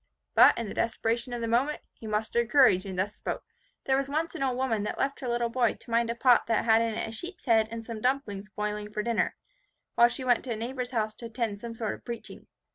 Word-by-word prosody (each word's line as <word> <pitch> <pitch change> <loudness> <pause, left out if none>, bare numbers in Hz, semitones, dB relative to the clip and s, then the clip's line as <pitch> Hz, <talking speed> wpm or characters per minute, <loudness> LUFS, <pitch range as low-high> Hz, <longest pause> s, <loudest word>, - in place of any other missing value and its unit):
But, - - +7
in 230 - -3
the - - -6
desperation 230 +1 -1
of 240 -1 -3
the 230 - -1
moment, 255 +6 +1
he 225 - -10
mustered 220 +2 0
courage, 240 -9 +5
and 190 -1 -5
thus 195 +3 0
spoke, - - -4 0.4
"There 265 - +3
was 275 0 0
once 315 +3 -1
an - - -6
old 260 -2 0
woman 245 -5 0
that 210 - -3
left 275 +1 -1
her 255 - -5
little 240 0 0
boy 240 -2 +2
to 235 - -13
mind 230 0 +2
a 235 - -1
pot 245 0 +4
that 225 -1 +1
had 225 0 +5
in 230 -1 0
it - - -2
a - - -6
sheep's 350 - -8
head 225 -3 +4
and 230 0 -6
some 225 -2 -6
dumplings 215 -6 -1
boiling 210 0 -4
for 210 0 -2
dinner, 235 0 0 0.6
while 235 - +6
she 250 +2 -5
went 245 -2 +3
to 245 - -2
a - - -3
neighbour's 245 +3 -4
house 220 -4 -1
to 235 - -8
attend 225 -3 -3
some 235 -1 -6
sort 220 -2 -2
of - - -11
preaching. 235 -1 -8
230 Hz, 255 wpm, -28 LUFS, 220-250 Hz, 0.6 s, But